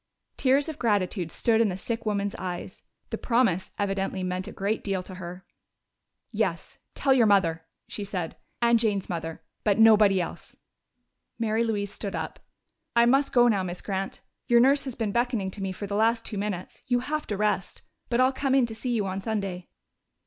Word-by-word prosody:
Tears 275 +3 +3
of 310 -2 -6
gratitude 195 -6 0
stood 225 +5 +2
in 225 - +3
the 185 - -3
sick 230 +3 -3
woman's 200 -1 0
eyes; 180 -2 -5 0.3
the - - -3
promise 230 -7 +1
evidently 195 -2 -1
meant 185 0 -2
a - - -6
great 205 +3 -2
deal 195 -2 -1
to 185 - -10
her. 180 0 -8 0.9
"Yes, - - -2 0.2
tell 275 - +3
your 240 -4 +5
mother," 165 -5 +3 0.2
she 205 - -5
said. 185 -4 -4 0.3
"And 235 0 +5
Jane's 210 -4 0
mother. 165 -2 -4 0.2
But 205 -1 +2
nobody 215 -3 +6
else." 175 - -5 0.8
Mary 225 0 +1
Louise 205 -3 -2
stood 200 -1 -5
up. - - -4 0.6
"I 235 0 +6
must 270 +4 +3
go 245 -1 +5
now, 205 -5 +3
Miss 180 -1 -5
Grant. 195 -1 -3 0.3
Your 240 -1 +6
nurse 275 +3 +4
has 260 -3 -5
been 220 -3 -1
beckoning 235 -4 0
to 200 - -7
me 195 -1 -2
for 195 +2 -6
the 200 0 -3
last 225 +2 +2
two 210 - -3
minutes. 200 -3 -4
You 245 -1 +2
have 300 +4 -3
to 205 - -2
rest.... 210 -2 -1 0.3
But 240 0 +1
I'll 260 +1 +4
come 270 0 +1
in 265 -3 +5
to 230 - -6
see 245 +3 -3
you 210 -3 0
on 190 0 -3
Sunday." 195 -5 -3
210 Hz, 190 wpm, -27 LUFS, 190-235 Hz, 0.9 s, nobody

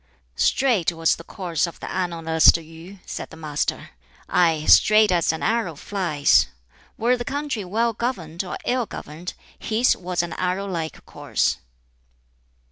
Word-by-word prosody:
"Straight 230 - +2
was 165 -1 +1
the 165 - -10
course 175 -3 -2
of 170 - -10
the - - -7
Annalist 165 -3 +3
Yu," 165 +4 -12
said - - -6
the 160 - -12
Master 150 -2 -3 0.4
"aye, 165 -3 +2
straight 215 -1 +6
as 170 -3 +2
an 160 - -5
arrow 220 -8 0
flies; 160 -4 +2 0.5
were 240 +3 +2
the 240 - -4
country 280 -4 -3
well 225 +5 0
governed 190 -8 -3
or 180 - -5
ill 245 -2 0
governed, 160 +5 -8 0.2
his 230 +3 +2
was 180 -1 -2
an 170 -1 -5
arrow 185 +2 -1
like 165 -5 -5
course. - - -1
180 Hz, 145 wpm, -23 LUFS, 165-215 Hz, 0.5 s, straight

